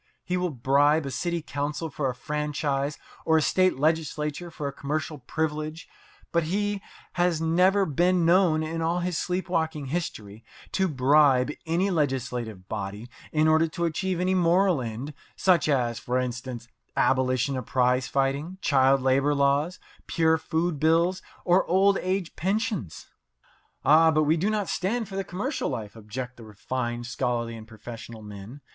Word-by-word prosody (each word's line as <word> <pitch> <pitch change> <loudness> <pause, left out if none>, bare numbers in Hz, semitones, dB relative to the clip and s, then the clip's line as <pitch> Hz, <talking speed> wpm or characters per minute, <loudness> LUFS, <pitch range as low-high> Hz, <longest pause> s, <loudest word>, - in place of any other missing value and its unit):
He 180 - -2
will 180 0 0
bribe 145 +3 +2
a 135 - -4
city 170 +2 -2
council 145 +2 -3
for 140 -1 -1
a 125 - -4
franchise 145 0 -2 0.3
or 160 0 +3
a - - +3
state 185 -2 +2
legislature 155 +2 -1
for 150 -3 -5
a 140 - -4
commercial 150 +2 -3
privilege; 155 +4 -3 0.4
but 170 - +2
he 205 +3 -1 0.3
has 175 -2 +1
never 180 +5 +3
been 175 +3 +2
known, 170 -2 +4
in 165 +1 -3
all 170 +2 0
his 175 -1 -1
sleep 180 +1 -2
walking 160 -4 -1
history, 110 - -4 0.3
to 190 -1 +1
bribe 140 -2 +4 0.2
any 180 +5 +1
legislative 125 - -2
body 105 +2 -5 0.2
in 155 0 +3
order 160 +1 +4
to 170 +2 -2
achieve 180 +2 -1
any 185 +1 +1
moral 180 -2 +3
end, 120 +5 -5 0.2
such 175 -5 +3
as, 120 -5 +1
for 125 +1 -1
instance, 125 -1 -4 0.3
abolition 130 +1 +2
of 130 -3 -5
prize 125 0 +2
fighting, 140 +6 -1
child 135 -3 +3
labour 135 +2 +3
laws, 140 +5 +2 0.3
pure 160 -1 +2
food 160 -1 -1
bills, 170 +4 +2 0.2
or 180 +1 +4
old 195 +2 +4
age 185 -1 -2
pensions. 190 - -2 0.8
"Ah, 160 +4 +6
but 155 -1 +3
we 155 +2 +3
do 180 +6 0
not 210 -3 -1
stand 215 +7 -1
for 195 - -8
the 195 - -1
commercial 200 - -3
life," 105 -2 -5
object 120 +3 -7
the 120 - -11
refined, 120 +3 -4
scholarly, 120 -2 -2
and 110 -1 -10
professional 110 0 -10
men. 105 +6 -10
150 Hz, 160 wpm, -26 LUFS, 130-175 Hz, 0.8 s, Ah